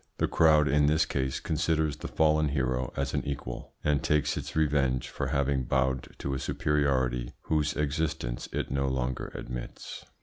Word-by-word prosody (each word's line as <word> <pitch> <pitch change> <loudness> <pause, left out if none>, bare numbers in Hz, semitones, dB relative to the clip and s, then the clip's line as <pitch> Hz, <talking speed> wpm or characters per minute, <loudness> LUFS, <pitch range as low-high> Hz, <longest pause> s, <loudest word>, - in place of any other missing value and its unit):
The - - +1
crowd 75 -2 +5
in 75 +1 +4
this 80 +1 +3
case 65 -1 -1
considers 80 -2 0
the - - -6
fallen 75 -1 +3
hero 65 -3 -1
as 70 - -1
an - - 0
equal, 65 -3 -5
and 75 -2 +2
takes 75 -1 +1
its - - -5
revenge 70 -5 +1
for - - -3
having 70 -2 +1
bowed 65 0 0
to 70 - -3
a 65 - -2
superiority 65 -5 0
whose 75 -1 +1
existence 75 -5 -2
it - - -3
no 70 0 0
longer 65 -1 -2
admits. - - -7
70 Hz, 165 wpm, -29 LUFS, 65-75 Hz, -, crowd